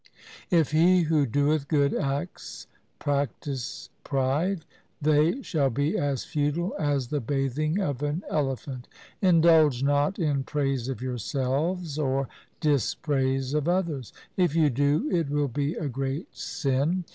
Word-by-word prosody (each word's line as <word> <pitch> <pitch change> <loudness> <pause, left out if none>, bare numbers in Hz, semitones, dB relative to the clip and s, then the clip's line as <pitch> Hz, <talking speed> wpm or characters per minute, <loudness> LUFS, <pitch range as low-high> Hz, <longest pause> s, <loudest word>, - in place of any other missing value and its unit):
4 175 - +5
If 155 - -3
he 175 +4 +5
who 155 -3 +2
doeth 145 +4 +1
good 145 -2 +2
acts 140 +5 -3 0.3
practise 140 -2 -3
pride, 150 +7 0 0.3
they 155 - +2
shall 145 -6 +1
be 140 +5 0
as 140 -3 -1
futile 150 +5 -1
as 140 -5 0
the 150 - 0
bathing 140 - -1
of 145 -9 -2
an 150 +5 -2
elephant. 135 -3 -2 0.3
Indulge 160 -7 +5
not 145 +7 +2
in 145 -7 0
praise 135 -3 -1
of 130 -1 -4
yourselves 140 - -2
or 135 -2 0 0.3
dispraise 135 -2 0
of 150 0 0
others. 170 - -1 0.3
If 175 -5 +2
you 155 -3 +4
do, 145 - +1
it 165 -5 +1
will 145 0 +1
be 145 +5 -1
a 155 - -3
great 135 +3 -4
sin. 145 +7 -1
145 Hz, 135 wpm, -27 LUFS, 135-160 Hz, 0.3 s, 4